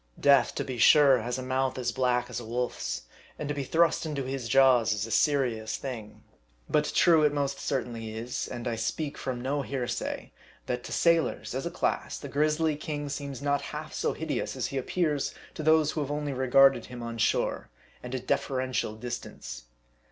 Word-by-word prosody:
Death, 140 -3 +4
to - - -1
be 130 -2 -5
sure, 140 0 +7
has 120 +3 -3
a 130 - -4
mouth 130 +1 0
as 120 -1 -1
black 125 0 +1
as - - -5
a - - -8
wolf's, 115 - -3 0.3
and 150 - -4
to 145 - -1
be 145 -1 -3
thrust 165 +5 +2
into 150 -4 -3
his 130 -2 -4
jaws 125 -3 +5
is 105 0 -2
a 115 - -8
serious 120 -8 +1
thing. 115 -6 -7 0.4
But 150 0 +1
true 165 -3 +6
it 150 -1 +4
most 140 -1 -1
certainly 115 -5 -3
is 120 +2 -3
and 120 0 -5
I 115 -1 -1
speak 140 +6 -2
from 130 -2 -4
no 140 +3 -1
hearsay 130 -3 -3 0.3
that 125 0 -3
to - - -7
sailors, 170 -1 +2
as - - -2
a - - -2
class, - - -1
the - - -8
grisly 155 +1 +1
king 145 -1 -4
seems 140 -2 -5
not 145 0 +1 0.2
half - - -7
so - - 0
hideous - - -3
as - - -2
he 135 - -3
appears 150 0 -1 0.2
to - - -6
those 155 -1 +4
who 155 - -2
have 145 - -3
only 145 -1 -2
regarded 135 +1 +5
him 125 -1 -8
on 115 0 -5
shore, - - 0 0.3
and 125 +1 -5
at 130 - -4
a - - -19
deferential 130 -5 -1
dis 120 +2 -4
tance. - - -9
130 Hz, 200 wpm, -28 LUFS, 120-145 Hz, 0.4 s, sure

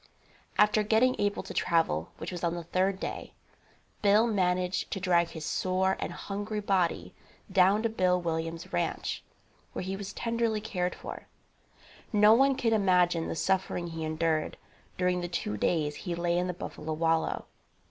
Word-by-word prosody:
After 210 +1 +5
getting 220 +4 +3
able 205 0 0
to - - -8
travel, 160 - +1
which - - -6
was 180 -1 -6
on 170 0 +1
the 170 - -5
third 190 +3 0
day, - - -5 0.7
Bill 210 +2 +5
managed 180 -4 0
to 195 - -3
drag 175 -2 +3
his 160 -2 -7
sore 185 +2 +1
and - - -3
hungry 205 +2 -4
body 190 -4 0 0.4
down 195 +3 +4
to 230 - +2
Bill 185 -4 +2
Williams' 165 0 -4
ranche, 85 - -2 0.5
where - - -4
he 190 +1 -3
was 200 0 -6
tenderly 230 -2 -1
cared 180 -4 -2
for. - - -8 0.8
No 210 -1 +6
one 270 +3 +4
can 235 -4 +1
imagine 180 -5 +3
the - - -3
suffering 185 0 0
he 165 -1 -5
endured 155 0 -1 0.4
during 180 0 +1
the 175 - -3
two 170 -11 -3
days 150 - 0
he 175 -3 -4
lay 170 0 0
in 180 +1 +1
the 180 - -2
buffalo 155 -2 -5
wallow. 165 +1 0
180 Hz, 165 wpm, -29 LUFS, 170-205 Hz, 0.8 s, No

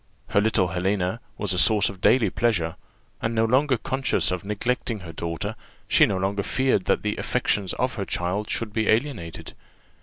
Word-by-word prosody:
Her 100 - +3
little 105 -4 +2
Helena 95 +3 -1 0.2
was 100 -3 0
a 90 - +1
source 105 0 +5
of 95 -1 -7
daily 115 -7 +4
pleasure; 90 -9 0 0.5
and 115 +1 -1
no 110 0 +3
longer 130 +3 +3
conscious 130 -1 0
of 90 -1 -3
neglecting 110 +1 -2
her 85 -2 -9
daughter, 85 +7 -4 0.3
she - - +5
no 95 - -1
longer 100 +2 -1
feared 130 -3 +1
that - - +1
the 105 0 -1
affections 100 -3 0
of 125 +1 -1
her 100 -4 -3
child 95 +5 -2
should 110 -3 -2
be 110 -2 0
alienated. 110 - -1
105 Hz, 180 wpm, -24 LUFS, 95-115 Hz, 0.5 s, source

